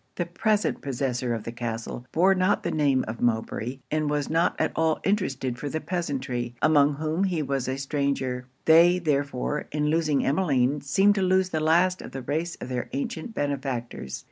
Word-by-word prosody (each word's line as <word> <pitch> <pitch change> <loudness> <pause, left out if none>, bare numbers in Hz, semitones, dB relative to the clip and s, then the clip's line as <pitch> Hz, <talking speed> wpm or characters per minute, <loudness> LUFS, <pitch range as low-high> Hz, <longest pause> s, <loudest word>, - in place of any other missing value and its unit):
The 175 - -1
present 210 +5 0
possessor 130 -2 -2
of 110 - -6
the 115 - -5
castle 120 +1 -5
bore 185 +4 +4
not 185 +2 +1
the - - -1
name 140 -4 +2
of 110 +2 -6
Mowbray, 120 +2 -1
and 155 -1 0
was 145 0 -1
not 165 +2 +2
at - - +1
all 160 -1 +1
interested 135 -11 -1
for 145 - -3
the 160 - -2
peasantry, 135 -9 -3
among 145 -2 +4
whom 160 +5 -1
he 175 -5 0
was 135 -2 -2
a 130 +1 -2
stranger; 135 -3 -2 0.2
they 170 +3 +6
therefore, 145 -3 -1
in 150 0 0
losing 155 -3 +1
Emmeline, 140 -3 +1
seemed 195 +8 +3
to 200 - -1
lose 185 0 +2
the 160 - -1
last 175 +4 +3
of - - -10
the 135 -1 -5
race 160 +5 -2
of - - -6
their 125 -1 -3
ancient 160 - -4
benefactors. 130 - -3
145 Hz, 185 wpm, -26 LUFS, 130-170 Hz, 0.2 s, they